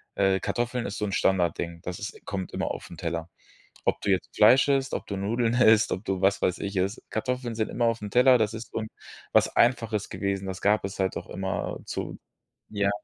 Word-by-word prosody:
äh 95 -1 +2
Kartoffeln 120 0 -1
ist 100 - -4
so 105 - -1
'n 100 - -3
Standardding. 85 -2 +1
Das 90 -1 -5
ist-– 105 - -7
kommt 95 -2 -4
immer - - -2
aufn 85 - -7
Teller. 85 0 -3 0.5
Ob - - +1
du 100 - -3
jetzt 95 - 0
Fleisch 125 +6 +6
isst, 135 -1 +1
ob - - -3
du 100 - -4
Nudeln 115 +4 0
isst, 110 -3 +5
ob 95 +4 -3
du, 95 -1 -1
was 100 +1 +3
weiß 90 - +1
ich, 100 -1 -4
isst, 95 +4 -1
Kartoffeln 125 0 -2
sind 110 -1 -1
immer 120 - 0
aufn 115 -3 -1
Teller, 125 +3 +6
das 110 -1 0
ist 115 0 -7
so - - -2
'n 110 - -4 0.5
was - - +4
Einfaches 115 -4 +2
gewesen, 100 -1 -3
das 95 -1 -5
gab 105 -1 +3
es 95 - -6
halt 95 -1 0
doch - - -7
immerzu. 95 +1 -4 0.5
Ja. 100 -1 0
105 Hz, 210 wpm, -27 LUFS, 95-115 Hz, 0.5 s, Fleisch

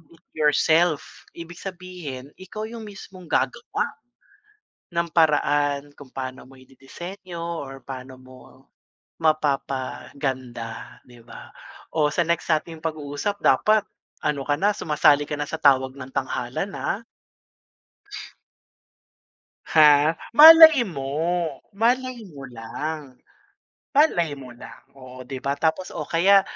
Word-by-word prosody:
It - - -27
Yourself, 155 +1 +1
ibig 170 +1 -10
sabihin, 175 -8 -8
ikaw 215 +3 -7
yung 225 0 -7
mismong 190 -3 -12
gagawa 130 - -1 1.1
ng 170 0 0
paraan 145 -3 +2
kung 145 - -12
paano 130 -1 -6
mo 135 - -17
ididisenyo 170 +7 -10
or 145 -6 -6
paano 130 -1 -8
mo 130 0 -15 0.9
mapapaganda, 135 -4 -3
'di 120 -1 -16
ba? - - -12 0.5
O, 150 -2 +3
sa 170 - +1
next 170 0 -1
nating 160 0 -1
pag-uusap, 155 +5 -3
dapat 215 +11 +3 0.4
ano 145 -2 -1
ka 145 - +2
na, 205 - +3
sumasali 145 -1 +3
ka 150 - -5
na 145 - -3
sa - - -3
tawag 130 -2 +3
ng 135 -1 -9
tanghalan 130 +6 -3
ah. 200 - -2 2.7
Ha? 150 0 +5 0.2
Malay 315 -2 +10
mo, 160 +1 -2 0.2
malay 245 +2 0
mo 140 -3 -10
lang, 130 +4 -7 0.8
malay 175 - +3
mo 135 -3 -11
lang, 120 - -13 0.2
oo, 130 -1 -11
'di 130 +1 -7
ba? 140 +2 -2
Tapos, 160 +5 -1
oh, - - -3
kaya 195 +4 +5
150 Hz, 115 wpm, -23 LUFS, 135-175 Hz, 2.7 s, Malay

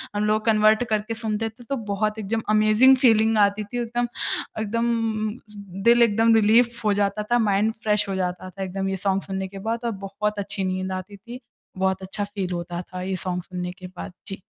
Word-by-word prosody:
हम 210 - +1
लोग 215 +1 +1
कन्वर्ट 215 +1 +4
करके 215 +1 -1
सुनते 225 -1 -2
थे 240 +3 -16
तो 275 - 0 0.2
बहुत 215 +2 -1
एकदम 220 +2 -2
अमेजिंग 215 +5 +6
फ़ीलिंग 225 -3 +4
आती 205 +1 +3
थी। 240 +4 -4
एकदम 240 +1 -1 0.5
अ, 215 - -3
एकदम 225 0 -1 0.4
दिल 235 +1 +6
एकदम 225 0 +4
रिलीफ़ 230 +2 +4
हो 210 - +4
जाता 205 +1 0
था। 240 - +4
माइंड 215 0 +2
फ्रेश 210 -1 +2
हो 195 - -1
जाता 185 0 -3
था 195 +2 -6
एकदम 195 +1 -3
ये 195 - -1 0.2
सॉन्ग 195 - 0
सुनने 190 -1 -4
के 195 +1 -9
बाद 225 +3 -2
और 230 - 0
बहुत 210 +2 -2
अच्छी 195 0 -3
नींद 185 0 -2
आती 185 +2 -6
थी। 240 +5 -10 0.4
बहुत 190 0 0
अच्छा 195 +2 -4
फ़ील 200 -3 -4
होता 175 0 -4
था 180 0 -8
ये 190 +1 -2
सॉन्ग 180 -1 -3
सुनने 180 -1 -5
के 185 0 -10
बाद। - - -7
जी। 195 -1 -6
210 Hz, 205 wpm, -24 LUFS, 190-225 Hz, 0.5 s, अमेजिंग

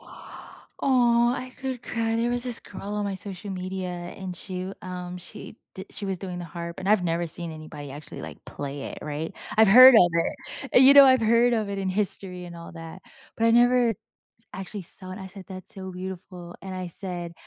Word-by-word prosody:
Aw, - - -13 0.9
I 255 -1 -6
could 260 -2 -4
cry. 225 -1 -1
There 235 +1 0
was 245 0 -1
this 245 -2 +1
girl 195 - -10
on 210 0 -1
my 200 -1 -2
social 195 +1 -4
media, 185 0 -4
and 180 +1 -7
she 185 +1 -5
um, 180 -1 -6
she 180 - -10 0.2
did 190 - -8
she 205 - -3
was 190 -2 -2
doing 180 -2 -6
the 175 - -6
harp, 170 +2 -7
and 190 - -3
I've 210 -3 +3
never 170 0 0
seen 170 0 +4
anybody 150 -2 -9
actually, 145 +2 -9
like, - - -10
play 140 0 -6
it, - - -7
right? 150 +2 -4 0.2
I've 220 -1 +6
heard 255 +5 +10
of 180 -6 +7 0.6
it. - - +7
You 270 +2 +8
know, 280 -1 +11
I've 260 -2 +5
heard 235 +2 +4
of 220 -3 0
it 200 0 -4
in 195 -1 -2
history 185 -2 -2
and 170 -1 -9
all 170 0 -10
that, 165 +2 -10 0.3
but 225 - 0
I - - +5
never 240 +1 +4
s - - -2 0.6
actually 195 +1 -6
saw 185 +2 -4
it. 185 - -8
I 190 - -8
said, 190 0 -10
"That's 185 -1 -6
so 190 -1 -7
beautiful." 180 -1 -8
And 190 -1 -6
I 185 -1 -4
said, 175 -1 -2
190 Hz, 215 wpm, -25 LUFS, 175-220 Hz, 0.9 s, know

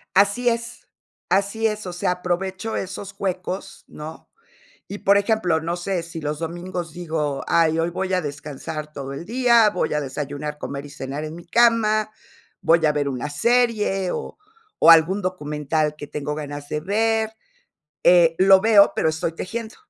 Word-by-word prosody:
Así 200 +6 +3
es, 235 0 -3 0.4
así 200 +4 +1
es, 215 -2 -2
o 180 - -5
sea, 175 +1 0
aprovecho 185 +4 -3
esos 195 +1 -5
huecos, 185 0 -4
¿no?, 155 +1 -9 0.6
y, 205 - -6
por 200 +1 +4
ejemplo, 200 -6 +1
no 170 +2 -2
sé, 175 0 -2
si 170 0 -8
los 150 -1 -3
domingos 175 +1 -5
digo: 155 -4 -3
"Ay, 165 -1 +3
hoy 165 +1 0
voy 190 +2 -3
a 185 - +3
descansar 150 0 -6
todo 140 -2 -6
el 140 - -6
día, 235 0 +4
voy 205 - -1
a 150 - 0
desayunar, 145 +2 -5
comer, 140 -1 -6
y - - -10
cenar 140 +1 -6
en 155 0 -6
mi 170 +1 -11
cama, 215 +1 +3 0.5
voy 165 0 +4
a 150 - +4
ver 145 -1 -1
una 135 +1 -3
serie, 210 +1 +1
o - - -5 0.4
o - - +8
algún 165 +5 +5
documental 150 -4 -2
que 145 - -8
tengo 150 0 -4
ganas 145 -1 -6
de 150 - -3
ver", 220 +4 +1 0.7
eh, 170 -2 +6
lo 190 0 +6
veo, 210 -2 +6
pero 160 - +2
estoy 160 +1 -2
tejiendo. 225 +6 -6
175 Hz, 170 wpm, -22 LUFS, 150-200 Hz, 0.7 s, o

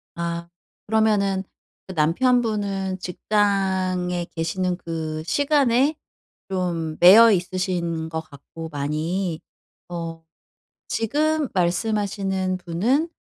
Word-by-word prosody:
아 170 0 -3 0.4
그러면은 205 -3 +2 0.4
그 190 - -8
남편분은 200 +1 +1
직장에 185 -2 0
계시는 175 +2 -1
그 160 -2 -4
시간에 280 - +2 0.5
좀 170 -4 -2
매여 215 +6 +9
있으신 175 -3 -1
것 160 0 -3
같고 160 +2 -10
많이 155 +4 -2 0.5
어 165 -1 -6 0.7
지금 300 +6 0
말씀하시는 190 0 0
분은 220 - 0
185 Hz, 185 characters per minute, -23 LUFS, 170-210 Hz, 0.7 s, 매여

